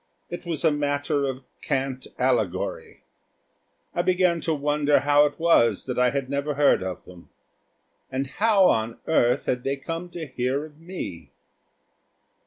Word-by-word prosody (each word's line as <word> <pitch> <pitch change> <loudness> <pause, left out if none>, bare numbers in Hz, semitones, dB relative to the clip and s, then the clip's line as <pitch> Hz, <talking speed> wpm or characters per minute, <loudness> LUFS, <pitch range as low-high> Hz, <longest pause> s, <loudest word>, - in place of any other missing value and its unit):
It 175 0 -7
was 165 0 -2
a 160 - +5
matter 145 -1 0
of 130 0 -5 0.2
cant 135 -2 -2
allegory. 120 -8 -1 0.9
I 175 - +1
began 180 -2 +2
to 160 - 0
wonder 145 0 +2
how 145 +1 +5
it 145 - -9
was 120 - +3
that 125 -1 -3
I 125 0 +4
had 135 0 -2
never 140 +2 -2
heard 145 -7 +4
of 95 -1 -5
them. 90 -1 -15 0.8
And 130 +1 -1
how 205 +6 +3
on 110 +1 0
earth 125 -6 +2
had 125 0 -1
they 135 +1 -1
come 165 +5 -6
to 170 -2 -6
hear 130 +2 -2
of 150 -1 -16
me! 165 - -7
145 Hz, 155 wpm, -25 LUFS, 130-160 Hz, 0.9 s, a